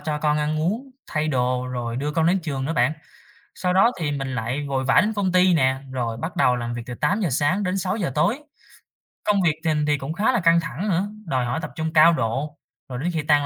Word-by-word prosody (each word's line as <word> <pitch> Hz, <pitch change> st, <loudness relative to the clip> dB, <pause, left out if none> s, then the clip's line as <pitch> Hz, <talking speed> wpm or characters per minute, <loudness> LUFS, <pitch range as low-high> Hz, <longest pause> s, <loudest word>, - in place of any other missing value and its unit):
cho 150 Hz, 0 st, -2 dB
con 150 Hz, 0 st, +1 dB
ăn 155 Hz, +1 st, -1 dB
uống, 225 Hz, -, -2 dB, 0.2 s
thay 155 Hz, 0 st, -1 dB
đồ, 125 Hz, -2 st, 0 dB
rồi 120 Hz, -2 st, -4 dB
đưa 145 Hz, +3 st, -2 dB
con 160 Hz, +1 st, +2 dB
đến 185 Hz, +3 st, +2 dB
trường 135 Hz, -4 st, -3 dB
nữa 160 Hz, -, -1 dB
bạn. 150 Hz, -2 st, +2 dB, 0.6 s
Sau 180 Hz, -1 st, -1 dB
đó 195 Hz, +6 st, +4 dB
thì 150 Hz, -3 st, -1 dB
mình 135 Hz, -2 st, -3 dB
lại 125 Hz, +5 st, -2 dB
vội 135 Hz, -1 st, -1 dB
vã 135 Hz, -, +5 dB
đến 210 Hz, +3 st, 0 dB
công 195 Hz, -3 st, 0 dB
ty 185 Hz, 0 st, +5 dB
nè, 130 Hz, -4 st, +3 dB, 0.2 s
rồi 120 Hz, -3 st, -2 dB
bắt 160 Hz, +8 st, -5 dB
đầu 125 Hz, -1 st, +3 dB
làm 120 Hz, 0 st, -4 dB
việc 120 Hz, -, -5 dB
từ 125 Hz, -, -5 dB
8:00 180 Hz, -, 0 dB
sáng 145 Hz, +10 st, +1 dB
đến 190 Hz, 0 st, -1 dB
6:00 185 Hz, -3 st, -1 dB
tối. 205 Hz, -, +2 dB, 0.9 s
Công 205 Hz, -2 st, +2 dB
việc 160 Hz, -4 st, +2 dB
thình 150 Hz, -2 st, +1 dB
thì 150 Hz, -1 st, +2 dB
cũng 140 Hz, +4 st, -5 dB
khá 210 Hz, +7 st, +2 dB
là 240 Hz, -, +1 dB
căng 170 Hz, -2 st, +4 dB
thẳng 165 Hz, -, -4 dB
nữa, 190 Hz, +2 st, 0 dB, 0.2 s
đòi 130 Hz, -7 st, 0 dB
hỏi 120 Hz, +6 st, -2 dB
tập 160 Hz, -, -6 dB
trung 160 Hz, 0 st, -3 dB
cao 165 Hz, +2 st, +7 dB
độ. 135 Hz, +3 st, -2 dB, 0.3 s
Rồi 125 Hz, -1 st, -5 dB
đến 175 Hz, +5 st, -1 dB
khi 160 Hz, -3 st, -2 dB
tan 145 Hz, -1 st, +3 dB
150 Hz, 245 wpm, -23 LUFS, 130-180 Hz, 0.9 s, cao